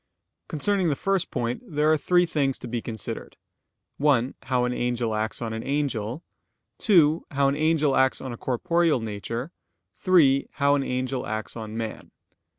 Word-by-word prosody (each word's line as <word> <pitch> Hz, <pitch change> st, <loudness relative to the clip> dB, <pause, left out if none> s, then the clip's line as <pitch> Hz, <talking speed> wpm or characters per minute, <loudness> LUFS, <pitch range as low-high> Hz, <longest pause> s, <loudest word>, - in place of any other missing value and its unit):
Concerning 185 Hz, +3 st, 0 dB
the 145 Hz, -, +1 dB
first 195 Hz, +3 st, 0 dB
point, 120 Hz, -1 st, -2 dB
there 155 Hz, -7 st, +1 dB
are -, -, +5 dB
three 175 Hz, +3 st, +3 dB
things 140 Hz, -5 st, 0 dB
to -, -, -8 dB
be 120 Hz, 0 st, -3 dB
considered: 110 Hz, -3 st, -6 dB, 0.6 s
(1) 135 Hz, -3 st, +2 dB
How 125 Hz, 0 st, +1 dB
an 125 Hz, -, -1 dB
angel 120 Hz, -2 st, -1 dB
acts 110 Hz, +2 st, -2 dB
on 115 Hz, -1 st, -3 dB
an 110 Hz, -, -4 dB
angel; 135 Hz, -1 st, -2 dB, 0.6 s
(2) 165 Hz, -7 st, +4 dB
How 140 Hz, -1 st, +2 dB
an 140 Hz, -, +1 dB
angel 155 Hz, -2 st, +2 dB
acts 130 Hz, 0 st, +3 dB
on 130 Hz, -2 st, -6 dB
a -, -, -5 dB
corporeal 165 Hz, +4 st, +1 dB
nature; 115 Hz, -, -5 dB, 0.4 s
(3) 140 Hz, -, +4 dB
How 140 Hz, -1 st, +3 dB
an 145 Hz, -, +2 dB
angel 130 Hz, 0 st, -2 dB
acts 110 Hz, 0 st, -4 dB
on 110 Hz, -1 st, -6 dB
man. 110 Hz, -1 st, -5 dB
135 Hz, 165 wpm, -25 LUFS, 120-155 Hz, 0.6 s, are